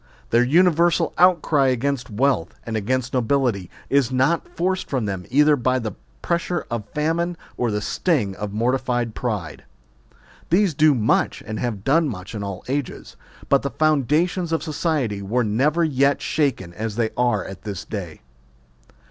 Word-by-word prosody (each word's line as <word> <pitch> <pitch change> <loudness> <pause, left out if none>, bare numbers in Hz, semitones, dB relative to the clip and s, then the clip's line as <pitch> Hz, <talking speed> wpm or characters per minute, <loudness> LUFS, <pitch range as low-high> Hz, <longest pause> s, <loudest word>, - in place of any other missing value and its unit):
Their 115 - +5
universal 170 +3 +3
outcry 165 -6 +4
against 130 0 -1
wealth, 115 -5 0
and 115 - -4
against 125 +4 -1
nobility, 125 -7 0 0.2
is 135 -3 +2
not 135 +6 +1
forced 185 +2 -1
from 130 -5 -1
them 95 -3 -4
either 150 +3 +5
by 130 -1 +1
the 115 -4 -3 0.3
pressure 170 0 -1
of 105 -3 -4
famine 165 +3 0 0.2
or 120 - 0
the 105 -1 -1
sting 105 - 0
of 105 -1 -4
mortified 120 +1 0
pride. 105 -12 -4 0.9
These 185 0 +3
do 150 0 +4
much 110 -3 +1
and 110 0 -5
have 110 -5 -3
done 155 +4 +3
much 95 -4 -7
in 105 - -4
all 100 -1 -6
ages; 140 0 -4 0.3
but 140 - +3
the 140 - -2
foundations 155 +4 +1
of 165 - 0
society 145 - -1
were 115 +6 0
never 140 +10 +1
yet 140 -2 +2
shaken 130 - -1
as 110 +2 -4
they 115 -1 0
are 120 -6 +1
at 95 -1 -9
this 100 -4 -6
day. 90 -7 -6
130 Hz, 155 wpm, -22 LUFS, 110-155 Hz, 0.9 s, Their